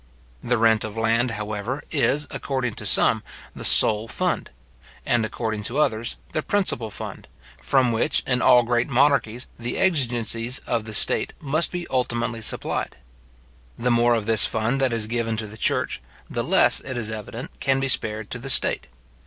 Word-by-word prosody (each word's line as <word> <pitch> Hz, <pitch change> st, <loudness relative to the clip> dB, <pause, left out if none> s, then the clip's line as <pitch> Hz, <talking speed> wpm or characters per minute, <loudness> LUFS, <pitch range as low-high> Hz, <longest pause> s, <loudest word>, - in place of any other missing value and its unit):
The 120 Hz, 0 st, +1 dB
rent 110 Hz, -1 st, +3 dB
of 110 Hz, 0 st, -7 dB
land, 115 Hz, +2 st, +1 dB
however, 105 Hz, +5 st, -4 dB
is, 150 Hz, 0 st, +1 dB
according 130 Hz, -4 st, -3 dB
to -, -, -5 dB
some, -, -, +3 dB, 0.3 s
the -, -, -8 dB
sole 110 Hz, +1 st, +5 dB
fund; -, -, -2 dB, 0.6 s
and, 120 Hz, -2 st, +1 dB
according 110 Hz, -1 st, -3 dB
to 125 Hz, -, -3 dB
others, 115 Hz, -6 st, 0 dB, 0.2 s
the 155 Hz, -, -1 dB
principal 170 Hz, -, -1 dB
fund, 105 Hz, -, -8 dB, 0.3 s
from 125 Hz, -, +2 dB
which, 115 Hz, -, +1 dB
in 125 Hz, -1 st, 0 dB
all 125 Hz, -1 st, +6 dB
great 120 Hz, +2 st, 0 dB
monarchies, 130 Hz, -3 st, +1 dB
the 120 Hz, +1 st, -4 dB
exigencies 120 Hz, -, +1 dB
of 115 Hz, -3 st, -2 dB
the 110 Hz, -1 st, -4 dB
state -, -, +2 dB
must 155 Hz, +4 st, 0 dB
be 175 Hz, -1 st, -4 dB
ultimately 120 Hz, -3 st, -1 dB
supplied. -, -, -2 dB, 0.8 s
The 125 Hz, +1 st, 0 dB
more 120 Hz, 0 st, +3 dB
of 110 Hz, -2 st, -2 dB
this 110 Hz, -1 st, +6 dB
fund 115 Hz, +5 st, -1 dB
that 130 Hz, -2 st, +2 dB
is 115 Hz, -2 st, 0 dB
given 115 Hz, 0 st, -2 dB
to 110 Hz, -, -3 dB
the 105 Hz, +1 st, -10 dB
church, 110 Hz, -, -1 dB, 0.3 s
the -, -, -3 dB
less, -, -, +4 dB
it 130 Hz, -2 st, -6 dB
is 110 Hz, -2 st, -1 dB
evident, 110 Hz, +3 st, -8 dB
can 135 Hz, -1 st, +1 dB
be 135 Hz, -, -1 dB
spared 110 Hz, -4 st, 0 dB
to 125 Hz, -, -4 dB
the 135 Hz, +3 st, -6 dB
state. -, -, +2 dB
120 Hz, 175 wpm, -23 LUFS, 110-130 Hz, 0.8 s, all